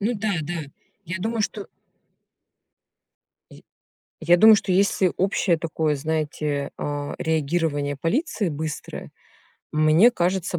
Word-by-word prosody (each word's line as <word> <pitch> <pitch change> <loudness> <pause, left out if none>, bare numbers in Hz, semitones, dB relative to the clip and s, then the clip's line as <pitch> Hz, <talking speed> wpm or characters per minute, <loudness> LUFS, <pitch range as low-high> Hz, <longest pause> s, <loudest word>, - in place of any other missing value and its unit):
Ну 225 +4 0
да, 215 -1 -2
да, 170 +3 -4 0.5
я 170 +2 -4
думаю 225 +2 -1
что. 205 -1 -4 1.8
Й - - -15 0.6
я 175 +2 +4
думаю, 220 +2 +8
что 195 - -2
если 190 -1 +2
общее 185 -2 +1
такое, 155 -2 -1
знаете, 150 -1 -2
а, 145 0 -4
реагирование 155 -2 -1
полиции 205 - -1
быстрое, 155 0 -6 0.6
мне 155 +9 +5
кажется, 180 -3 -1
170 Hz, 115 wpm, -23 LUFS, 155-195 Hz, 1.8 s, думаю